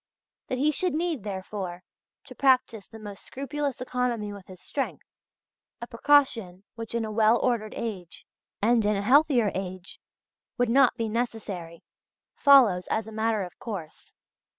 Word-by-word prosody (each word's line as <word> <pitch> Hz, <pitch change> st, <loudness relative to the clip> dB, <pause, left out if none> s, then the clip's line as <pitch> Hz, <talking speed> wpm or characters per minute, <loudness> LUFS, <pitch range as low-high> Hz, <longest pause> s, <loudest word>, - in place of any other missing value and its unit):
That 255 Hz, -, -2 dB
he 295 Hz, +4 st, +2 dB
should 360 Hz, +2 st, -1 dB
need, 325 Hz, -5 st, -1 dB
therefore, 190 Hz, -2 st, -5 dB, 0.4 s
to -, -, -12 dB
practise 255 Hz, -6 st, +2 dB
the 225 Hz, -, -12 dB
most 205 Hz, -2 st, -10 dB
scrupulous 280 Hz, 0 st, -4 dB
economy 245 Hz, -5 st, -2 dB
with 200 Hz, -2 st, -12 dB
his 185 Hz, -1 st, -12 dB
strength 275 Hz, +7 st, -4 dB, 0.7 s
a 235 Hz, -, -5 dB
precaution 230 Hz, -8 st, +2 dB
which 230 Hz, 0 st, -7 dB
in 230 Hz, -1 st, 0 dB
a 215 Hz, -, -5 dB
well 220 Hz, +2 st, +4 dB
ordered 235 Hz, -4 st, -1 dB
age, 190 Hz, -7 st, -6 dB, 0.4 s
and 230 Hz, +1 st, +4 dB
in 210 Hz, 0 st, +2 dB
a 200 Hz, -, -2 dB
healthier 255 Hz, -3 st, +4 dB
age, 185 Hz, -1 st, -6 dB, 0.6 s
would 245 Hz, -2 st, +1 dB
not 260 Hz, +1 st, +4 dB
be 230 Hz, -, -1 dB
necessary 210 Hz, -7 st, -4 dB, 0.5 s
follows 245 Hz, -11 st, +5 dB
as 220 Hz, -, -1 dB
a 220 Hz, -, -10 dB
matter 220 Hz, -1 st, 0 dB
of 180 Hz, -, -10 dB
course. 195 Hz, -9 st, -8 dB
225 Hz, 150 wpm, -27 LUFS, 200-255 Hz, 0.7 s, follows